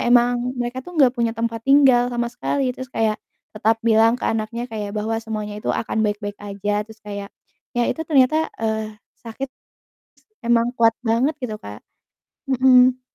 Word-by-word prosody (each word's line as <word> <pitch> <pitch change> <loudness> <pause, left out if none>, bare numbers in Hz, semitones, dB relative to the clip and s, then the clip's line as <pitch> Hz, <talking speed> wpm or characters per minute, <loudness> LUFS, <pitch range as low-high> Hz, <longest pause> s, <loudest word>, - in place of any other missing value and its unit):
emang 245 +1 +3
mereka 245 +1 -3
tuh 355 +3 -8
gak 260 -3 +5
punya 235 -2 0
tempat 230 0 -2
tinggal 265 -3 +5
sama 240 -1 -1
sekali, 260 +2 -1
terus 260 -1 -8
kayak 220 -1 0 0.4
tetap 220 +1 +1
bilang 225 0 +5
ke - - -2
anaknya 225 +2 -2
kayak 210 -2 -4
bahwa 220 +2 -1
semuanya 210 -2 -5
itu - - 0
akan 220 -1 -1
baik-baik 205 0 -3
aja, 205 +1 -2
terus 220 0 -14
kayak 200 -1 -6 0.5
ya 240 - +2
itu 320 - -3
ternyata, 310 +2 +3
eee, 220 -1 -2 0.3
sakit 235 +4 -5
s - - -109 0.8
emang 235 0 +3
kuat 225 -1 +5
banget 245 +7 +2
gitu 220 -4 -3
Kak 105 - -10 0.7
Mhm. 255 -1 +5
230 Hz, 165 wpm, -21 LUFS, 215-250 Hz, 0.8 s, gak